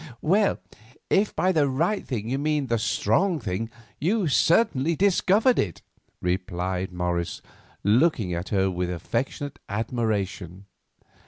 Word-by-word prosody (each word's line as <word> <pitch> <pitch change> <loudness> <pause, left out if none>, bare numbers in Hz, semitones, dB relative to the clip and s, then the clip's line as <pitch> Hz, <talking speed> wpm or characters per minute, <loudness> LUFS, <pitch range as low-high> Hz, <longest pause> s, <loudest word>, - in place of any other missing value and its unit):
"Well, 200 +6 +3 0.5
if 200 +2 +2
by 185 - +2
the 150 -5 +2
right 170 +10 0
thing 110 -4 -3
you 135 +3 -1
mean 150 -1 0
the 115 -2 0
strong 180 - +1
thing, 110 0 -3 0.3
you 190 +5 +1
certainly 160 - +3
discovered 200 - +3
it," 90 -6 -2 0.4
replied 90 0 -2
Morris, 90 -1 -2 0.4
looking 110 - +2
at 85 +2 -4
her 95 -2 +1
with 90 0 -2
affectionate 120 +10 -3
admiration. 100 -4 -2
115 Hz, 120 wpm, -25 LUFS, -, 0.5 s, Well